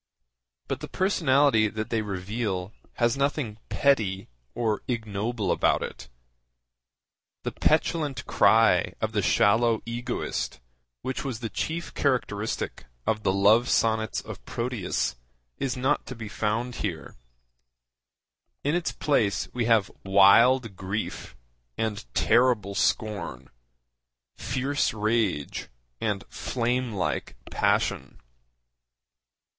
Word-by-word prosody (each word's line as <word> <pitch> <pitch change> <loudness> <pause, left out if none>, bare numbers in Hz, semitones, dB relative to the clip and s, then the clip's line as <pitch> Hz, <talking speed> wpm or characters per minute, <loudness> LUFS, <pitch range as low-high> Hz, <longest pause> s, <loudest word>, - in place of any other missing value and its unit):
But - - -2
the - - -6
personality 140 - +3
that 110 +1 -5
they 115 -2 +1
reveal 100 0 -3 0.2
has 120 0 +1
nothing 140 -6 -1
petty 110 -9 +1 0.3
or 110 -3 0
ignoble 110 -1 -2
about - - +2
it. - - -8 1.3
The - - -2
petulant 155 -2 +1
cry - - +4
of - - -1
the - - 0
shallow 115 +2 +3
egoist 120 +1 -3 0.4
which 130 - -3
was 130 -6 -4
the 115 -3 -5
chief 165 - -3
characteristic 115 -6 -1 0.2
of 110 -1 0
the 95 - +2
Love 105 +5 +4
Sonnets 110 -1 +1
of - - -9
Proteus 115 - -2 0.4
is 130 -2 -1
not 135 +4 0
to 130 - -6
be 110 -2 -7
found 110 +4 -2
here. - - -4 1.5
In 145 - +1
its 175 -1 0
place 115 -9 +1
we 120 -2 0
have 110 -4 +3
wild 100 +4 +5
grief 95 +4 -4 0.4
and 105 - -3
terrible 115 -4 +3
scorn, 95 - -1 0.8
fierce 135 -1 -1
rage 105 -8 0 0.3
and 105 -3 -1
flame 125 0 -1
like 95 -8 -2 0.2
passion. - - 0
115 Hz, 110 wpm, -26 LUFS, 105-125 Hz, 1.5 s, wild